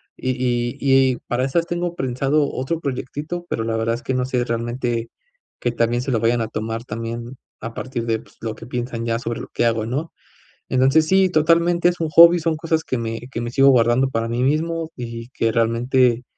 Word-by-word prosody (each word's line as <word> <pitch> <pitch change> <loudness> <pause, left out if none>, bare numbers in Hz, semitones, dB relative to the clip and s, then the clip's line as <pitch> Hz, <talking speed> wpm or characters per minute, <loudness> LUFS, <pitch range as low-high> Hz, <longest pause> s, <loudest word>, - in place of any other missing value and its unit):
Y 130 - -2
y 120 -1 0
y 135 -2 +3
para 120 +1 0
esas 165 +6 +1
tengo 175 0 -2
prensado 135 +2 0
otro 135 +6 -2
proyectito, 145 +5 -4
pero 115 - -2
la 115 0 -1
verdad 115 +1 0
es 120 - -9
que 130 - -2
no 125 0 0
sé 125 -1 -1
realmente, 120 0 -2 0.5
qué 120 - 0
tan 115 -1 +1
bien 120 +1 0
se 135 +2 -3
lo 115 -3 +1
vayan 120 +1 +2
a 115 - -1
tomar 115 +1 -4
también, 115 +2 -5 0.2
a 115 - -6
partir 125 -2 -4
de, 115 -1 0
pues, - - -20
lo 110 -1 -4
que 115 - -11
piensan 120 -1 -4
ya 115 0 0
sobre 115 -1 -4
lo - - -8
que - - +1
hago, 115 -2 +1
¿no? 140 +8 -3 0.6
Entonces, 135 +5 +4
sí, 190 +2 +4
totalmente 170 +2 +3
es 175 - -4
un 165 -2 -1
hobby, 170 +3 +8
son 165 0 0
cosas 160 0 -1
que 130 - -2
me 115 -1 -3
que 115 - -4
me 120 0 -4
sigo 135 +2 +5
guardando 125 +1 +4
para 115 -2 -1
mí 120 +2 -1
mismo, 160 +3 0
y 115 -1 -6
que 115 -3 0
realmente 120 +2 +2
125 Hz, 215 wpm, -21 LUFS, 115-150 Hz, 0.6 s, hobby